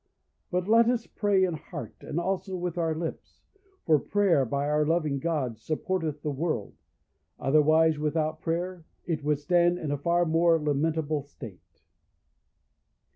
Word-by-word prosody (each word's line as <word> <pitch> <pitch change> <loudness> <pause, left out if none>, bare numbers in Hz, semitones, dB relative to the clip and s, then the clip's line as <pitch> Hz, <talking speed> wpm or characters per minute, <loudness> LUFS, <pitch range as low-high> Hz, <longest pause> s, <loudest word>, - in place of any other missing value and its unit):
But 180 0 -1
let 230 +2 +5
us 240 -2 0
pray 200 -2 +1
in 180 -2 +1
heart, 155 - -7
and 155 - -3
also 190 +1 -2
with 180 -1 -3
our 165 -2 0
lips; 165 0 -6 0.4
for 155 -2 +4
prayer, 190 -8 +2
by 140 +4 -1
our 150 0 +2
loving 155 -3 0
God, 135 -7 -2
supporteth 155 +2 -3
the 150 - -1
world; 145 - -2 0.7
otherwise, 155 +2 +3
without 155 +1 -1
prayer, 175 +1 -3 0.2
it 160 -4 -2
would 150 0 +1
stand 175 +3 +2
in 155 -4 -4
a 145 - -2
far 170 +3 +2
more 165 +1 +3
lamentable 150 0 0
state. 90 - -13
160 Hz, 145 wpm, -27 LUFS, 150-175 Hz, 0.7 s, let